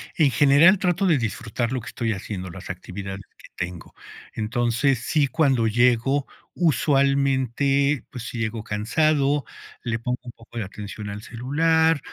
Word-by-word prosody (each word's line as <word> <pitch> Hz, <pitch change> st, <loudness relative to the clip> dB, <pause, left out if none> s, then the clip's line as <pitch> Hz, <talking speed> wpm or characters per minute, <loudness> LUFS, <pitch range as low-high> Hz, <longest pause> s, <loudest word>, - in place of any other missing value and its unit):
En 155 Hz, -4 st, +4 dB
general, 145 Hz, +8 st, +6 dB
trato 180 Hz, +1 st, +1 dB
de 165 Hz, -5 st, +4 dB
disfrutar 115 Hz, 0 st, -3 dB
lo 130 Hz, -2 st, -2 dB
que 110 Hz, -, -12 dB
estoy 115 Hz, -2 st, -2 dB
haciendo, 95 Hz, -2 st, -6 dB
las -, -, -10 dB
actividades 95 Hz, +1 st, -6 dB
que -, -, -16 dB
tengo. 90 Hz, -1 st, -6 dB, 0.4 s
Entonces, 120 Hz, +4 st, +1 dB
sí, 145 Hz, +4 st, +1 dB
cuando 135 Hz, -5 st, +2 dB
llego, 120 Hz, +4 st, +2 dB, 0.3 s
usualmente, 140 Hz, -2 st, +2 dB
pues, 125 Hz, -3 st, -7 dB
si 120 Hz, -, -6 dB
llego 115 Hz, -1 st, -3 dB
cansado, 140 Hz, +7 st, +1 dB, 0.4 s
le 115 Hz, -2 st, -1 dB
pongo 125 Hz, +2 st, -3 dB
un 125 Hz, -1 st, -9 dB
poco 115 Hz, 0 st, -10 dB
de 110 Hz, -, -2 dB
atención 105 Hz, +1 st, -7 dB
al 100 Hz, +1 st, -7 dB
celular, 160 Hz, +7 st, +2 dB
125 Hz, 150 wpm, -24 LUFS, 115-145 Hz, 0.4 s, general